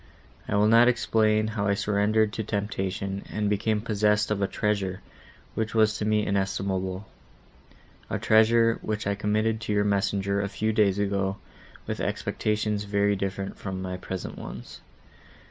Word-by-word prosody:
I - - -1
will 105 +1 +4
not 115 +2 +6
explain 110 -3 +2
how 110 -2 -2
I 100 - +2
surrendered 105 +1 +1
to 110 - -3
temptation, 100 -2 -3
and 105 -1 -1
became 105 +1 0
possessed 105 -1 +1
of 105 -1 0
a 100 - +2
treasure, 100 -3 -1 0.5
which 110 0 -3
was 110 -1 +4
to 105 - -1
me 105 0 +2
inestimable; 95 -1 -1 1.0
a - - -1
treasure, 115 +1 +4
which 110 0 -3
I 100 - +1
committed 110 +2 0
to 105 -1 -2
your 105 0 +2
messenger, 100 0 0
a 100 - -2
few 110 +2 -1
days 100 -3 +3
ago, 100 -1 0 0.5
with - - -4
expectations 105 -1 -1
very 100 0 +1
different 95 0 -4
from 95 -2 -4
my 95 0 -4
present 90 0 -6
ones. - - -9
105 Hz, 155 wpm, -26 LUFS, 100-110 Hz, 1.0 s, not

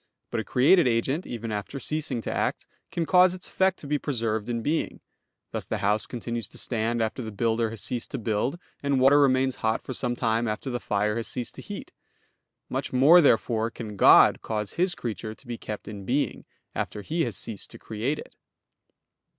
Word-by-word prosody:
But 115 - -1
a - - -2
created 135 - +4
agent, 130 +8 0
even 115 -2 -5
after 105 +6 -4
ceasing 145 -3 -2
to - - -3
act, - - -1 0.3
can 170 - -1
cause 180 +1 +5
its 185 - -7
effect 190 -1 +1
to - - -9
be 145 0 0
preserved 115 -6 -2
in 115 -1 -2
being; 155 +5 -1 0.5
thus - - -4
the - - -1
house 105 +2 +1
continues 115 -3 -4
to - - -12
stand 115 0 0
after 110 +4 -3
the 110 -2 -5
builder 115 +2 0
has 115 -2 -7
ceased 120 -2 -3
to - - -4
build; 115 +7 -1 0.2
and 140 -2 +1
water 135 +3 +6
remains 130 -2 +3
hot 110 0 0
for 130 - -5
some 120 -1 -2
time 115 -1 +1
after 110 +5 -3
the 120 - -2
fire 105 0 0
has 115 - -2
ceased 120 -2 -3
to - - -10
heat. - - -8 0.8
Much - - -3
more, 145 +8 +7
therefore, 115 -5 +2
can 110 -3 -7
God - - +7
cause 105 -2 -3
His 180 +1 +1
creature 110 -2 -5
to - - -22
be 120 -1 -6
kept 105 -1 -6
in 105 -2 -7
being, 130 +8 -1 0.3
after 105 - -4
He 165 - 0
has 110 -6 -4
ceased 105 0 -4
to - - -11
create 115 +8 -3
it. - - -10
120 Hz, 200 wpm, -26 LUFS, 110-140 Hz, 0.8 s, more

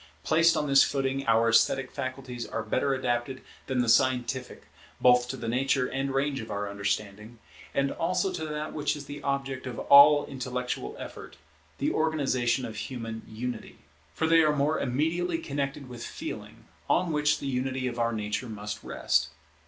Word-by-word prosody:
Placed 165 +1 +4
on 150 - 0
this 140 -1 +6
footing, 135 -1 -1
our 115 0 +4
esthetic 125 +3 +3
faculties 130 -2 -5
are 115 - -3
better 135 +5 0
adapted 125 0 -2 0.2
than 130 -2 +1
the - - -3
scientific, 130 +1 +1 0.4
both 125 0 +5
to 130 - -5
the 115 - -6
nature 130 +2 +1
and 135 +1 -2
range 135 0 0
of 110 - -9
our 100 0 -3
understanding, 100 +2 -3 0.3
and 140 0 0
also 185 +3 0
to 160 -3 -4
that 150 0 -4
which 150 0 -1
is 145 -1 -8
the 145 +1 -8
object 135 -1 -2
of 120 -2 -6
all 145 +1 +7
intellectual 125 -1 -4
effort, - - -9 0.4
the - - 0
organization 135 -6 +1
of 110 -2 -7
human 115 0 -5
unity. 120 +1 -6 0.4
For - - 0
they 165 0 +5
are 155 -1 +3
more 150 +2 +1
immediately 160 +7 0
connected 140 -2 -4
with 120 -2 -8
Feeling, - - -7 0.2
on 175 - +2
which 150 0 +2
the - - -7
unity 130 0 -2
of 120 -1 -3
our 115 0 +1
nature 105 +2 -3
must 105 -1 -6
rest. 80 +2 0
130 Hz, 170 wpm, -28 LUFS, 120-145 Hz, 0.4 s, all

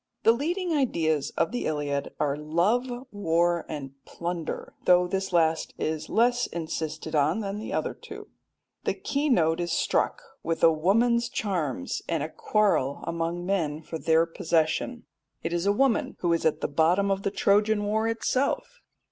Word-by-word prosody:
The 225 - +7
leading 340 +8 -1
ideas 160 - +1
of - - +1
the 245 - -2
Iliad 145 -2 -2
are 140 -2 +1
love, 170 - +1 0.2
war, 175 -3 +1
and 135 -3 -6
plunder, 170 -2 -5
though 180 0 +5
this 190 +1 -2
last 160 -2 +1
is 155 -1 -3
less 240 +3 +2
insisted 160 -1 -4
on 155 +7 +2
than 200 0 -4
the 215 - -6
other - - -1
two. - - -11 0.6
The - - 0
key 285 +2 -1
note 165 - +3
is 175 -1 -2
struck - - 0 0.2
with 165 0 -2
a 165 - +8
woman's 230 +9 +2
charms, 160 - -2
and 165 -4 0
a 155 - -4
quarrel 195 -10 +1
among 170 +1 -2
men 160 -5 -1
for 160 +1 -6
their 160 +1 +3
possession. 165 +8 -1 0.4
It 165 - -2
is 175 +3 0
a - - +5
woman 255 +2 +1
who 175 -1 +2
is 165 - +2
at 155 - -1
the - - 0
bottom 175 +7 +2
of 195 0 0
the 200 - 0
Trojan 205 +1 +2
war 215 +2 0
itself. 260 - -1
175 Hz, 165 wpm, -27 LUFS, 160-215 Hz, 0.6 s, a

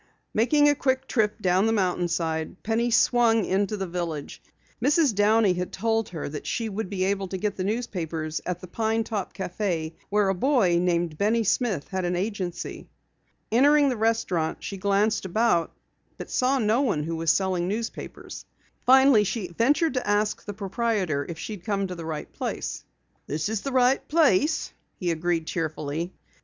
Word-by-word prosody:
Making 290 +7 +4
a 290 - +5
quick 265 -2 0
trip 215 -3 0
down 185 +3 +3
the - - +2
mountainside, 175 -4 -1
Penny 230 +2 +1
swung 230 -2 +3
into 200 +2 0
the 195 - -2
village. 170 -4 -5 0.4
Mrs. 290 -1 +3
Downey 205 -1 +4
had 180 0 -3
told 225 +1 0
her 165 -4 -5
that 145 +1 -6
she 230 -2 -2
would 210 -1 -4
be 190 -2 -1
able 195 0 0
to 190 - -4
get 205 +1 -2
the 185 - -3
newspapers 170 -8 -3
at 180 -1 -3
the - - -7
Pine 225 +4 0
Top 210 -4 -4
Cafe 175 -3 -3 0.2
where 205 -1 +2
a - - +2
boy 195 -5 +2
named 170 -3 0
Benny 225 +3 +2
Smith 210 - 0
had 190 -1 -2
an 175 0 0
agency. 185 -2 -4 0.6
Entering 285 +4 +5
the 255 - -1
restaurant, 215 -8 0
she 200 - -5
glanced 200 +3 +1
about 190 -3 +1 0.5
but - - -8
saw 260 +2 +2
no 225 +1 +2
one 200 - 0
who 165 +2 -3
was 165 0 -1
selling 185 0 +1 0.2
papers. - - -9 0.4
Finally, 265 -3 +7
she 195 -3 -3
ventured 270 - +2
to 255 -4 -2
ask 210 +1 +1
the 205 - -6
proprietor 195 - -1
if 165 - -5
she 215 - -5
had 190 -5 -9
come 200 -1 -1
to 185 - -5
the 170 -2 -7
right 155 -2 -5
place. - - -4 0.4
"This 155 +6 -2
is 220 -2 -2
the 275 - -4
right 255 +1 +3
place," 305 - +2 0.2
he 175 -3 -1
agreed 165 0 -1
cheerfully. 160 +1 -3
200 Hz, 175 wpm, -26 LUFS, 175-225 Hz, 0.6 s, Finally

